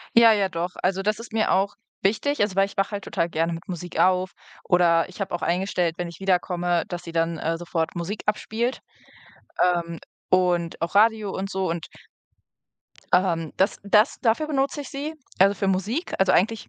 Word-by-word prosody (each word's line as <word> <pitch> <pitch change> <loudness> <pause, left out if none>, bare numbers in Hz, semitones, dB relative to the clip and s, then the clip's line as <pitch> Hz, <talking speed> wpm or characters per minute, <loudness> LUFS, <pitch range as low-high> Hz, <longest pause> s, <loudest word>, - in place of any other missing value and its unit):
Ja, 230 -1 +8
ja 200 -3 +2
doch. 175 0 -3
Also, 190 +1 +1
das 215 +2 0
ist 230 -1 -10
mir 220 -1 +1
auch 195 +2 +1 0.3
wichtig, 230 +9 +1
also 205 -2 +1
weil 195 0 +4
ich 200 - -13
wach 195 0 +1
halt 200 -1 -4
total 170 - -1
gerne 165 0 -1
mit 165 +1 -7
Musik 175 -1 -6
auf 185 0 +3 0.3
oder 170 -1 +3
ich 185 - -13
habe 195 -2 -3
auch 175 - -3
eingestellt, 180 -1 0
wenn 175 - -2
ich 170 +1 -12
wiederkomme, 175 -2 +1
dass 175 0 -5
sie 170 - -7
dann, 165 0 0
äh, 165 +1 -1
sofort 165 -1 -2
Musik 180 +5 -4
abspielt, 225 +4 -1 0.8
ähm, 170 -2 0 0.3
und 175 -2 +1
auch 170 - -2
Radio 215 0 +4
und 195 +1 -4
so. 190 -2 -1
Und 165 -1 -4 1.3
ähm, 170 -4 +2
das 190 - +1
das 210 +4 +3
dafür 240 +6 +2
benutze 280 0 0
ich 275 - -9
sie, 290 +3 -5 0.2
also, 195 +2 +5
für 200 - -2
Musik. 205 - -1
Also, 190 -1 +3
eigentlich 220 +4 +1
190 Hz, 190 wpm, -24 LUFS, 175-210 Hz, 1.3 s, Ja